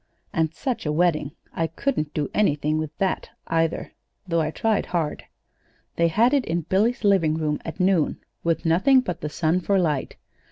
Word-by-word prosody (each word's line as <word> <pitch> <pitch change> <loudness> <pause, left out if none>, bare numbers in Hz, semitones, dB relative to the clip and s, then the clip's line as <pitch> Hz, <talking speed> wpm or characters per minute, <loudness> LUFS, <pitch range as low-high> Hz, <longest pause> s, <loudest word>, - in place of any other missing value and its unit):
"And 160 -1 +1
such 250 - -3
a - - +1
wedding! 155 -3 +1 0.2
I 165 - 0
couldn't 160 - -2
do 150 -2 0
anything 155 -6 +1
with 155 -1 -2
that, 190 -1 -1 0.2
either, 165 0 0 0.4
though 170 -1 +1
I 155 - 0
tried 220 +6 0
hard. 165 -4 -2 0.7
They 170 - +3
had 230 - +3
it 280 -3 +3
in 170 +1 -1
Billy's 215 +9 +1
living 185 -7 +3
room 155 -2 -1
at 165 - -7
noon, 180 -4 +2 0.3
with 165 0 0
nothing 195 +12 +5
but 180 -9 -5
the 150 - -3
sun 160 +3 +1
for 195 +2 +1
light. 155 -7 0
165 Hz, 175 wpm, -24 LUFS, 155-195 Hz, 0.7 s, nothing